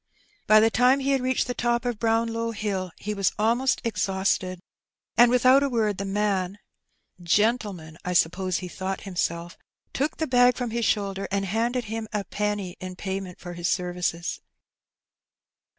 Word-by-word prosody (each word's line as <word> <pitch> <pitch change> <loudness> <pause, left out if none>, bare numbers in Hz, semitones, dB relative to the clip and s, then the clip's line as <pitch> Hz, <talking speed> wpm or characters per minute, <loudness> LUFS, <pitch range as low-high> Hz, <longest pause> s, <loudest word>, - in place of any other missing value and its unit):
By 215 0 +7
the 225 +1 +4
time 250 +4 +4
he 275 +1 0
had 270 -2 +2
reached 255 0 +1
the 245 - -3
top 240 +1 0
of 240 -3 -2
Brownlow 230 0 0
Hill 195 -4 -3
he 210 - -4
was 195 -2 +1
almost 235 +5 +2
exhausted, 190 -4 0 0.6
and 240 0 +7
without 255 +2 +5
a 280 - +1
word 215 -5 0
the 200 - -2
man 195 -1 -1 0.6
(gentleman, 190 -4 0
I 180 - -2
suppose 180 +2 +1
he 185 - -5
thought 190 +1 -4
himself) 175 -2 -3 0.3
took 290 +3 -1
the 320 - 0
bag 245 -2 +4
from 245 -3 -3
his 235 0 -1
shoulder 195 -1 0
and 200 0 -1
handed 235 +5 0
him 220 0 -5
a 210 -2 -1
penny 205 -3 -3
in 185 0 -7
payment 190 -1 -5
for 175 0 -8
his 175 +1 -2
services. 180 -1 -2
210 Hz, 165 wpm, -25 LUFS, 185-235 Hz, 0.6 s, By